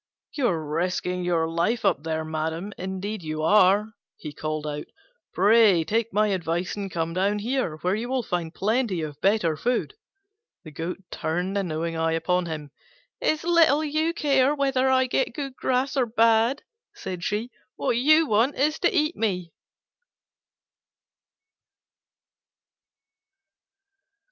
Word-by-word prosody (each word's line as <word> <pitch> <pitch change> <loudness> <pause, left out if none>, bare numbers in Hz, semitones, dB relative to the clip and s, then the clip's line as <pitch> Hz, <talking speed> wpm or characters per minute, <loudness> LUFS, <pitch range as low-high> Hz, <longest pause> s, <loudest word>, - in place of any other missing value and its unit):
"You 275 -4 +1
are 165 -6 -1
risking 180 +3 -2
your 170 -2 +1
life 170 +8 -1
up 195 - +2
there, 160 0 -3
madam, 160 +5 -3
indeed 190 +3 -5
you 155 -1 -4
are," 205 +3 +4 0.2
he 150 -2 -8
called 155 0 -4
out: 150 0 -5 0.4
"pray 200 -2 +5
take 225 +6 -1
my 210 +2 +2
advice 175 -2 -2
and 200 -1 -4
come 165 -1 -3
down 195 +3 +1
here, 230 - -1
where 180 +1 +1
you 230 +4 -3
will 260 -1 0
find 175 -5 -3
plenty 215 -1 0
of 150 -1 -7
better 195 -6 +2
food." 245 - -1 0.7
The 155 - -10
Goat 165 +4 -4
turned 180 +5 -2
a 200 - +1
knowing 165 -2 -3
eye 160 0 0
upon 180 +2 0
him. 150 -3 -6 0.5
"It's 310 0 0
little 325 -3 +4
you 310 +2 0
care 280 -2 +2
whether 265 -2 +1
I 260 0 +3
get 255 -1 -1
good 275 -3 -5
grass 255 +2 0
or 260 -3 +2
bad," 230 +3 +3 0.3
said 185 - -6
she: 215 +5 -2 0.2
"what - - -1
you 310 +6 +5
want 230 +3 +2
is 300 +3 +1
to - - +2
eat 310 -3 +1
me." 180 -6 -2
200 Hz, 145 wpm, -25 LUFS, 165-250 Hz, 0.7 s, pray